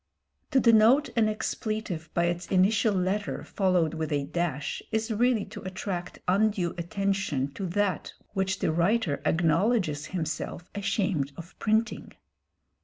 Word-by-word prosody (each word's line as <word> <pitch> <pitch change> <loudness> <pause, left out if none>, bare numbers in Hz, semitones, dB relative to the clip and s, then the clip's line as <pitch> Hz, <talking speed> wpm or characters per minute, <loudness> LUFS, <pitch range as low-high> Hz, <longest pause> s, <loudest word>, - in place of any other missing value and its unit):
To 270 - +4
denote 230 +5 +5
an 220 -2 +3
expletive 215 -6 -3
by 170 - +3
its 175 +1 -1
initial 200 +3 +3
letter 190 +3 -1
followed 185 -5 +1
with 160 -1 -3
a 145 -1 +1
dash 155 -2 -2
is 220 +1 -1
really 235 -1 +2
to 210 +1 -9
attract 185 -1 -5
undue 195 -2 +2
attention 175 -6 -1
to 195 +3 -4
that 200 +2 -1 0.2
which 190 0 0
the - - 0
writer 170 -1 +1
acknowledges 165 -1 +2
himself 175 0 -4
ashamed 190 -8 -1
of 170 +2 -10
printing. 220 0 0
190 Hz, 130 wpm, -28 LUFS, 170-215 Hz, 0.2 s, denote